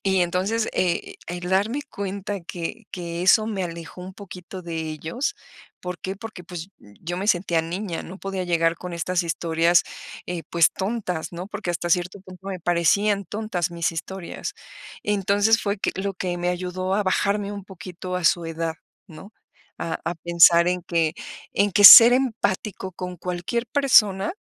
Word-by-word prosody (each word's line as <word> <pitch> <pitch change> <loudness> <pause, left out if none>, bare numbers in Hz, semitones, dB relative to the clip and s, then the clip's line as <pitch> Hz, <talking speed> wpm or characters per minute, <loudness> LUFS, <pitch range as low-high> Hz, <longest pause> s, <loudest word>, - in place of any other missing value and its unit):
Y 190 -1 +2
entonces, 190 +6 0
eh, 175 -2 -1
el 175 0 -5
darme 210 +9 +1
cuenta 200 0 -4
que 175 +7 -6
que 170 -1 -5
eso 215 +3 +5
me 195 -4 -2
alejó 170 +1 -8
un 185 +1 -9
poquito 185 -2 -10
de 170 -1 -6
ellos, 160 - -3 0.5
¿por 180 0 -6
qué? 190 - -5
Porque, 200 -3 -10
pues, 175 0 -8
yo 165 +12 -8
me 190 +2 -3
sentía 175 -4 +2
niña, 175 +1 -4
no 185 +3 -10
podía 195 -1 -4
llegar 165 -1 +1
con 180 +1 -8
estas 175 +2 -1
historias, 170 +1 +2 0.4
eh, 175 -2 -4
pues, 170 -1 +4
tontas, 190 -5 -3
¿no? 175 +2 -6
Porque 205 -4 -4
hasta 175 0 -3
cierto 180 +3 0
punto 185 0 -14
me 185 -2 -5
parecían 200 +4 +2
tontas 190 -4 -3
mis 170 0 -1
historias. 185 +2 -6 0.5
Entonces, 205 +2 +2
fue 200 0 -2
que - - -1
lo 195 +1 -2
que 180 -1 -3
me 175 0 -1
ayudó 185 +1 -3
a 210 - +1
bajarme 200 +1 0
un 200 -2 -7
poquito 180 -1 -8
a 180 - -2
su 175 -1 +3
edad, 165 0 -3 0.3
¿no? 190 +6 -13 0.5
A 165 -1 -3
a 170 - -2
pensar 170 +1 +5
en 180 0 -1
que 165 -2 0 0.4
en 200 0 +1
que 205 - +3
ser 235 +3 +13
empático 215 -6 -1
con 180 0 -6
cualquier 180 +8 -3
persona 215 - +3
180 Hz, 170 wpm, -23 LUFS, 170-200 Hz, 0.5 s, ser